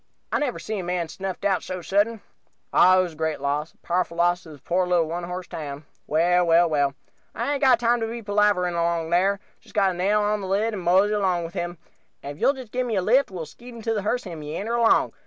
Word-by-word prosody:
"I - - +1
never 285 -5 -1
see 215 -1 -4
a - - -4
man 175 -2 -2
snuffed 190 +3 -5
out 195 -2 +2
so 185 -1 -6
sudden. 205 +4 +1 0.5
Ah, 185 +1 +6
it 185 - +4
was 175 -3 -5
a - - -17
great 160 -1 -1
loss 145 +3 -2
a, - - -33
powerful 175 -1 -1
loss 175 +1 +2
to 170 - -14
this 150 -2 -12
poor 180 +6 0
little 175 -2 +3
one 170 +2 -4
horse 180 +1 -5
town. 145 -3 -7 0.2
Well, 175 +3 +3
well, 170 +1 +5
well, 145 -3 +1 0.4
I 235 +6 -1
hain't 285 -1 -1
got 260 -4 +5
time 240 0 +2
to 225 - -2
be 230 +1 -6
palavering 205 -3 +2
along 170 -1 -1
here 195 +3 +2 0.3
got 195 -2 +3
to - - -2
nail 200 +4 +1
on 210 0 0
the 190 - -5
lid 210 +4 0
and 200 - -4
mosey 190 +4 +3
along 185 -4 +1
with 165 - -8
him; 175 -2 -4 0.5
and 145 +1 -6
if - - -17
you'll 275 - +4
just 255 -5 -10
give 250 0 -1
me 225 - -1
a 190 - +2
lift 255 +8 +3
we'll 180 -4 -6
skeet 240 +9 -14
him 240 - -11
into 225 0 -2
the 210 - -1
hearse 245 +5 -1
and 170 -4 -7
meander 160 +10 -4
along. 235 -1 +3
185 Hz, 255 wpm, -24 LUFS, 170-210 Hz, 0.5 s, Ah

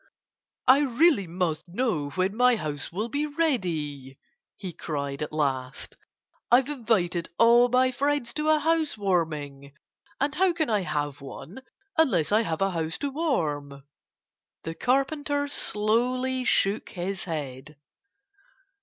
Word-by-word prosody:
"I 260 +2 +7
really 280 - +3
must 170 -1 -2
know 175 - -1
when 185 +2 0
my 250 +1 +4
house 150 -8 -5
will 210 +6 -2
be 285 +5 -1
ready!" 165 - -2 0.4
he 185 -4 -7
cried 140 -3 -4
at 150 - -3
last. 135 -4 -2 0.5
"I've 255 +3 +4
invited 215 - 0
all 235 +1 +6
my 255 +1 +3
friends 280 -2 -1
to 305 0 -1
a 310 - +5
house 315 -3 0
warming. 150 -8 -2 0.5
And 285 +1 0
how 365 +2 +2
can 315 -7 -1
I 210 - +3
have 145 -5 -3
one 145 - -9 0.4
unless 185 - +3
I 215 +2 +4
have 165 -6 -3
a 195 - +1
house 165 -1 -3
to 285 - -3
warm?" 150 - -2 0.8
The 165 - -4
Carpenter 285 - 0
slowly 250 +2 0
shook 200 -2 +1
his 190 +2 -4
head. 150 -3 -6
205 Hz, 135 wpm, -26 LUFS, -, 0.8 s, I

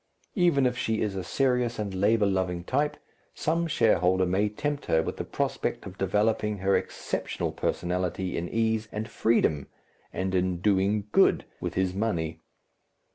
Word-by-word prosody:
Even 175 - +3
if 125 -1 +1
she 110 -2 -1
is 105 -2 -1
a 95 - -3
serious 125 +2 +1
and 105 -3 -3
labour 105 +3 +3
loving 95 -3 0
type, 145 +9 0 0.4
some 165 +2 0
shareholder 95 - +3
may 95 +4 +1
tempt 145 +6 -3
her 80 0 +3
with - - -4
the - - -3
prospect - - -2
of 95 0 -10
developing 105 +2 +1
her 95 +1 +2
exceptional - - -2
personality 90 +1 -2
in 85 +1 -3
ease 110 -1 0
and 110 +1 -4
freedom 105 -10 +1 0.4
and 95 0 -2
in 90 -1 +1
"doing 100 +2 +1
good" - - +4
with - - -4
his 95 -1 +1
money. 85 -6 -2
100 Hz, 155 wpm, -27 LUFS, 95-115 Hz, 0.4 s, good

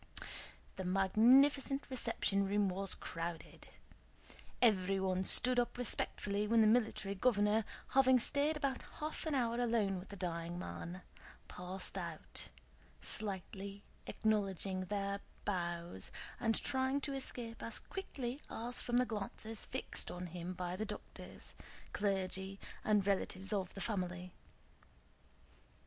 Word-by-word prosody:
The 190 - -2
magnificent 250 +9 +5
reception 230 -6 +1
room 200 0 +3
was 195 +1 0
crowded. 165 0 -5 0.9
Everyone 190 -4 +3
stood 250 +5 +6
up 240 - 0
respectfully 210 -3 0
when 230 +1 +5
the - - +7
Military 215 -3 +3
Governor, 210 0 +3 0.2
having 260 -1 +6
stayed 290 +5 +3
about 275 -3 -1 0.2
half 310 +1 -3
an 305 - +1
hour 240 -2 +1
alone 220 -6 +2
with 185 - -10
the 200 - -7
dying 170 -2 -3
man, 180 0 -5 0.4
passed 185 +2 -4
out, 170 -3 -6 0.5
slightly 200 - -3 0.2
acknowledging 195 -3 0
their 200 0 -1 0.3
bows 170 - -2 0.3
and 225 -2 +2
trying 265 +1 +1
to 280 0 -2
escape 240 -4 -4
as 230 - -3
quickly 270 -10 -4
as - - -20
possible 235 +2 -4
from 240 0 +1
the 250 - +5
glances 220 0 -3
fixed - - -1
on 180 0 -5
him 175 +1 -5
by 180 0 -3
the 210 - -2
doctors, - - -8 0.4
clergy, 195 -1 -1 0.2
and 210 -2 +3
relatives 195 0 0
of 190 -3 -1
the 195 - -5
family. 185 -4 -2
200 Hz, 125 wpm, -37 LUFS, 185-240 Hz, 0.9 s, the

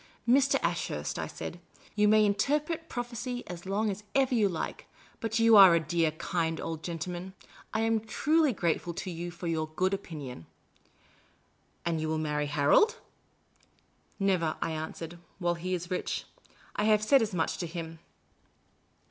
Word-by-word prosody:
" - - -38
Mr. 270 +3 +5
Ashurst," - - -2
I - - -2
said, - - -7 0.2
" - - -26
you 210 0 +4
may 215 0 +6
interpret 300 +10 0
prophecy 245 0 -4
as 175 +1 -8
long 205 +2 +1
as 200 +2 -7
ever 265 -1 +3
you 215 -4 +3
like, 170 - -5 0.3
but 225 0 -1
you 230 -1 +6
are 190 -4 +10
a - - +4
dear, 165 0 +1
kind 165 0 -2
old 160 -1 -4
gentleman. 175 +3 -5 0.4
I 220 - 0
am 225 0 +2
truly 300 +7 +2
grateful 170 -4 -1
to 185 - -4
you 170 +1 -5
for 175 +1 -9
your 160 -2 -1
good 185 +3 +1
opinion." 145 - -6 0.7
" - - -37
And 165 -2 0
you 155 - -1
will 160 - 0
marry 150 -1 -1
Harold? 145 - +4 0.4
" - - -37
" - - -38
Never," 185 -5 +1
I - - -1
answered; 160 +2 -6
" - - -35
while 175 -2 +1
he 180 +2 -2
is 175 +1 -6
rich. 180 - -2 0.5
I 205 - 0
have 215 -1 +4
said 270 +4 +5
as 215 -4 -1
much 160 - -1
to 175 - -2
him." 165 -1 -6
185 Hz, 180 wpm, -29 LUFS, 165-220 Hz, 0.7 s, are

